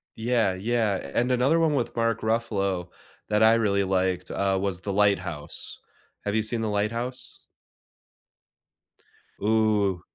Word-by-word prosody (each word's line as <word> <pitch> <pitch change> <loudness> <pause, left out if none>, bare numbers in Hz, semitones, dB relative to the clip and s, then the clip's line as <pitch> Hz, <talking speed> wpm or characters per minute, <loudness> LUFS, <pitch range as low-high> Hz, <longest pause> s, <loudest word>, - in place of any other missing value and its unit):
Yeah. 115 -4 +1
Yeah, 105 -7 -1
and 125 +2 +1
another 135 +7 +3
one 160 -2 +2
with 120 -3 -2
Mark 115 -1 0
Ruffalo 100 -5 -1 0.4
that 105 +1 +3
I 110 +1 +7
really 100 -3 +1
liked, 95 -1 -1
uh, 95 -1 0
was 95 -2 -2
The 100 0 -3
Lighthouse. 95 -7 0 0.5
Have 105 +1 -1
you 110 - +2
seen 115 +1 +1
The 110 - -1
Lighthouse? 115 +5 -1 1.9
Ooh. 105 -4 +2
105 Hz, 130 wpm, -26 LUFS, 95-115 Hz, 1.9 s, I